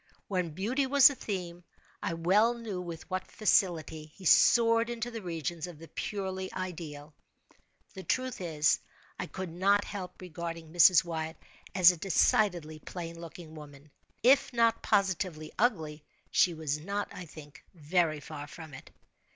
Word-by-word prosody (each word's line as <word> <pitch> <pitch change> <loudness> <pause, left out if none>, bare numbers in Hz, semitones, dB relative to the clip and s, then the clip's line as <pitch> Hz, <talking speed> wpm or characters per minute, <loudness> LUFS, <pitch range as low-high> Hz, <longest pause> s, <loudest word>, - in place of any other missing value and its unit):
When 180 -3 -1
beauty 225 - -1
was 280 0 +8
the - - -4
theme, 180 -8 -5 0.4
I 165 - -2
well 205 +8 +3
knew 220 -6 -5
with 170 -2 -8
what 185 -1 -4
facility 170 -7 +1
he 190 - -13
soared 230 +5 +5
into 240 0 -4
the 225 -1 -6
regions 170 -1 -4
of 175 -3 -10
the 165 +1 -13
purely 190 -2 -4
ideal. 160 -5 -6 0.8
The 190 - -8
truth 255 +2 -2
is, 155 -4 +2 0.4
I - - -3
could 185 -3 -6
not 200 +4 +2
help 185 -3 -7
regarding 165 -2 -7
Mrs. 175 +1 +7
Wyatt 160 -1 -4 0.4
as 185 -2 +8
a 175 - -8
decidedly 170 -2 +1
plain 170 +1 -7
looking 165 -1 -10
woman. 145 -1 -13 0.3
If 265 +3 +5
not 230 -1 +2
positively 185 -6 0
ugly, 160 -11 0 0.3
she 175 -2 +3
was 150 -2 -2
not, 200 +5 -3
I 180 - -8
think, 150 -2 -13
very 160 0 +1
far 145 -1 -8
from 160 0 -11
it. 130 - -11
175 Hz, 150 wpm, -30 LUFS, 160-200 Hz, 0.8 s, was